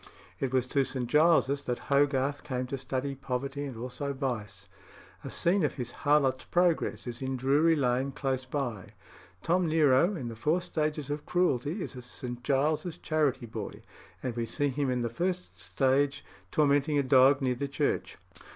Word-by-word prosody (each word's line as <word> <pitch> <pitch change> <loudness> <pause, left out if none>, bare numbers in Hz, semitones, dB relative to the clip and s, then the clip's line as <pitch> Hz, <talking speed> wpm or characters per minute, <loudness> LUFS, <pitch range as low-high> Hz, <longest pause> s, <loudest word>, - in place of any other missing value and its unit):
It 135 - -1
was 130 -2 +2
to 135 +2 +1
St. 130 -1 -3
Giles's 145 0 +3
that 125 -1 0
Hogarth 140 0 +2
came 130 -3 -2
to 135 +2 -4
study 135 +1 -3
poverty 135 +1 -4
and 130 -5 -7
also 130 +4 -4
vice. 125 -6 -4 0.6
A - - -6
scene 180 +2 +2
of 150 - 0
his 125 -3 -5
"Harlot's 140 -3 +2
Progress" 175 -2 +1
is 120 0 -6
in 130 0 -2
Drury 145 +6 +3
Lane, 130 -1 +1
close 130 -2 -2
by. 125 -8 -4 0.5
Tom 175 +1 +2
Nero, 155 +3 +4
in 135 -8 -5
the 115 - -6
"Four 155 +10 +1
Stages 155 -4 -2
of 145 0 -4
Cruelty," 175 - +1
is - - -7
a 125 - -7
St. 125 0 -7
Giles's 150 +5 0
charity 150 -8 0
boy, 110 -2 -7 0.4
and 125 -3 -3
we 115 -1 -2
see 145 +5 0
him 140 0 -1
in 125 -1 0
the 120 - 0
first 180 +9 -2
stage 140 +1 +1 0.2
tormenting 145 - +2
a 140 - +3
dog 130 +1 +5
near 130 -3 +1
the 140 +3 -3
church. 140 -1 -1
135 Hz, 175 wpm, -29 LUFS, 125-150 Hz, 0.6 s, dog